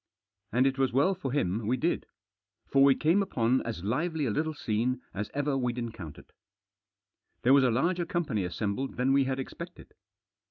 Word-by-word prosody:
And 125 Hz, +3 st, +3 dB
it 135 Hz, 0 st, +1 dB
was 135 Hz, -1 st, +2 dB
well 140 Hz, +10 st, +3 dB
for 160 Hz, -9 st, -4 dB
him 105 Hz, -5 st, -1 dB
we 125 Hz, +3 st, +1 dB
did. 170 Hz, +5 st, -1 dB, 0.6 s
For 135 Hz, 0 st, +4 dB
we 140 Hz, -1 st, +6 dB
came 165 Hz, +6 st, +3 dB
upon 125 Hz, -9 st, +1 dB
as 110 Hz, -7 st, -4 dB
lively 155 Hz, -, -1 dB
a 120 Hz, -, 0 dB
little 155 Hz, +6 st, -1 dB
scene 120 Hz, 0 st, -1 dB
as 105 Hz, +2 st, -4 dB
ever 145 Hz, -1 st, 0 dB
we'd 125 Hz, -2 st, -1 dB
encountered. 105 Hz, -11 st, -7 dB, 1.1 s
There 130 Hz, -, +5 dB
was 140 Hz, -1 st, +6 dB
a 130 Hz, -, +4 dB
larger 170 Hz, +9 st, 0 dB
company 150 Hz, -, -1 dB
assembled 100 Hz, +8 st, -3 dB
than 130 Hz, +2 st, +2 dB
we 135 Hz, -1 st, +4 dB
had 130 Hz, 0 st, -2 dB
expected. 135 Hz, -, -8 dB
130 Hz, 175 wpm, -29 LUFS, 115-145 Hz, 1.1 s, we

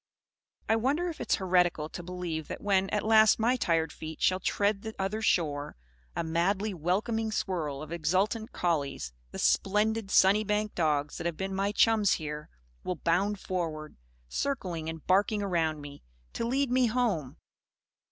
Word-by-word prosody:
I 225 Hz, -, +3 dB
wonder 290 Hz, +10 st, 0 dB
if 330 Hz, -, -7 dB
it -, -, -4 dB
is -, -, +6 dB
heretical 180 Hz, -5 st, +1 dB
to 175 Hz, -, -7 dB
believe 175 Hz, -3 st, -4 dB
that -, -, -6 dB
when 195 Hz, -1 st, +2 dB
at 210 Hz, 0 st, -1 dB
last 220 Hz, -1 st, +6 dB
my 235 Hz, +3 st, +2 dB
tired 165 Hz, -9 st, +1 dB
feet 160 Hz, 0 st, -8 dB
shall 185 Hz, 0 st, +2 dB
tread 200 Hz, +1 st, 0 dB
the 220 Hz, 0 st, -7 dB
Other 195 Hz, +3 st, -2 dB
Shore, 150 Hz, -9 st, 0 dB, 0.4 s
a -, -, -1 dB
madly 190 Hz, +6 st, 0 dB
welcoming 215 Hz, +7 st, -1 dB
swirl 155 Hz, -9 st, -2 dB
of 155 Hz, -, -10 dB
exultant 190 Hz, +7 st, 0 dB
collies 140 Hz, -, -2 dB, 0.2 s
the -, -, -8 dB
splendid 210 Hz, +1 st, +1 dB
Sunnybank 210 Hz, +2 st, +3 dB
dogs 150 Hz, -3 st, 0 dB
that 170 Hz, -, -2 dB
have 170 Hz, -2 st, -3 dB
been 190 Hz, 0 st, -3 dB
my 195 Hz, +1 st, 0 dB
chums 215 Hz, -1 st, +4 dB
here 150 Hz, -1 st, -5 dB, 0.3 s
will 180 Hz, -, -2 dB
bound 190 Hz, +6 st, 0 dB
forward, 160 Hz, -5 st, -4 dB, 0.3 s
circling 175 Hz, -, -3 dB
and 160 Hz, -2 st, -7 dB
barking 205 Hz, +3 st, +2 dB
around 165 Hz, -5 st, 0 dB
me, 145 Hz, 0 st, -10 dB, 0.3 s
to 230 Hz, -, -2 dB
lead 270 Hz, +1 st, 0 dB
me 255 Hz, -1 st, +4 dB
Home! 215 Hz, -, -1 dB
190 Hz, 160 wpm, -29 LUFS, 160-215 Hz, 0.4 s, is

